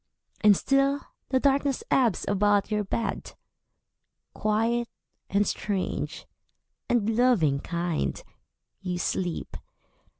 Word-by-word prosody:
And 205 -2 +7
still 275 +1 +2 0.3
the 260 - +2
darkness 275 0 +1
ebbs 235 -9 +2
about 205 +1 +2
your 210 0 +1
bed. 225 +3 -3 1.0
Quiet, 225 +2 0 0.4
and 200 +1 +2
strange, 200 -3 -3 0.6
and 230 -4 +2
loving 210 - +3
kind, 170 - -2 0.6
you 180 -2 -3
sleep. 175 0 -2
210 Hz, 95 wpm, -27 LUFS, 185-245 Hz, 1.0 s, And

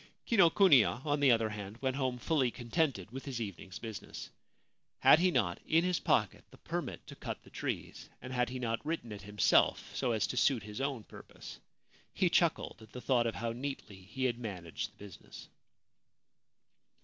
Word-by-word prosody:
Kinokuniya, 165 - +5
on 145 -1 +1
the 140 -2 +5
other 115 -2 +3
hand, 105 0 -7
went 130 +1 -1
home 130 -2 -1
fully 135 -1 +1
con 120 0 -10
tented 135 - 0
with 135 +2 -7
his 130 -4 -4
evening's 100 -3 -6
business. 110 -3 -8 0.7
Had 155 - +8
he 185 +1 +4
not 90 - 0
in 165 +1 +3
his 180 -1 +1
pocket 105 -5 +1
the - - -16
permit - - -5
to - - -10
cut - - -6
the - - -17
trees, - - -5
and 130 +1 -8
had 125 -1 +1
he 130 - -5
not 115 -2 -2
written 155 -8 -3
it 105 - -7
himself, 105 +1 +2
so 125 -3 0
as 110 -2 +1
to 125 - -4
suit 125 -4 +3
his 105 +4 -6
own 135 -5 -2
purpose? - - -12 0.6
He - - +2
chuckled - - +1
at 110 -1 -15
the 125 - -6
thought 120 -1 +2
of 115 - -3
how 115 0 -2
neatly 120 -5 -6
he 100 +8 -6
had 120 -2 0
managed 90 -8 -5
the - - -32
business. 100 -3 -12
120 Hz, 185 wpm, -33 LUFS, 105-135 Hz, 0.7 s, Had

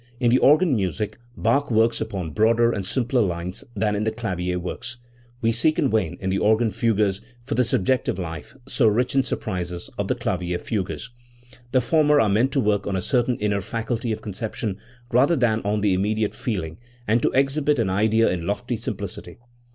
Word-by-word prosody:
In 120 -3 +3
the 130 - +5
organ 155 +1 +5
music 105 +2 -2 0.2
Bach 140 +6 +1
works 115 0 +2
upon 95 -6 -3
much - - -12
broader 115 +2 +4
and 100 - -3
simpler 125 +5 0
lines 90 +1 -3
than 105 0 0
in 105 - -1
the 110 - 0
clavier 90 -6 -2
works. 105 +7 -6 0.5
We 115 - +3
seek 135 +7 +2
in 140 - +2
vain 105 -7 0
in 95 0 -2
the 95 - +1
organ 110 +1 +3
fugues 105 -4 +1 0.2
for 120 - -4
the 125 +3 +3
subjective 120 -2 0
life, 80 - -6
so 130 -3 +2
rich 120 +4 +1
in 135 - +4
sur 130 - -2
prises, 90 -3 -5
of - - -1
the - - 0
clavier 90 -1 -2
fugues. 100 +4 -4 0.6
The 130 -1 +3
former 150 +3 +3
are 110 - +3
meant 115 +7 +2
to 140 - +2
work 105 -4 +1
on 100 - -1
a - - 0
certain 125 0 +1
inner 105 -1 0
faculty 115 +3 -3
of 110 - -4
conception 105 0 -4 0.3
rather 135 +7 +4
than 115 -5 +1
on 105 +1 0
the 100 -2 +2
immediate 105 +3 0
feeling, 90 -8 -4 0.3
and 115 +3 +3
to - - +2
exhibit 140 +2 +2
an 110 -6 0
idea 110 +3 +3
in 85 -2 -2
lofty 115 +4 -2
sim - - -4
plicity. - - -8
110 Hz, 200 wpm, -23 LUFS, 95-120 Hz, 0.6 s, the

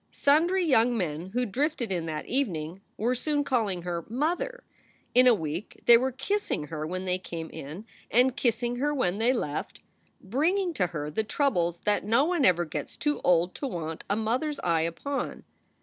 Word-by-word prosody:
Sundry 340 +6 +3
young 245 -5 +4
men 165 -3 -2
who 245 +6 -1
drifted 255 0 -1
in 170 -3 -2
that 155 -1 -4
evening 185 - -2 0.2
were 235 +4 +1
soon 290 +3 0
calling 215 -10 0
her 170 -1 -3
Mother. 355 - -1 0.3
" - - -36
In 255 +1 +7
a 245 - +8
week 165 +2 -5
they 235 - +9
were 260 +3 +2
kissing 265 - -2
her 155 -1 -4
when 185 +2 -4
they 185 0 0
came 165 -3 -6
in 160 +10 -8 0.2
and 250 +2 +4
kissing 240 -2 0
her 295 +3 0
when 200 -7 0
they 235 +3 +3
left, 155 - -3 0.4
bring 290 - +1
ing 370 -4 -1
to 185 - +1
her 150 -3 -5
the 220 +8 0
troubles 175 - 0
that 210 0 +1
no 230 +7 +3
one 340 -5 +2
ever 175 -1 +4
gets 155 - -6
too 295 -1 -1
old 175 0 +3
to 280 - -4
want 165 -7 -5
a 200 - +2
mother 230 +8 0
s 295 - -5
eye 165 -2 +2
upon. 170 - -3
225 Hz, 195 wpm, -28 LUFS, 175-280 Hz, 0.4 s, they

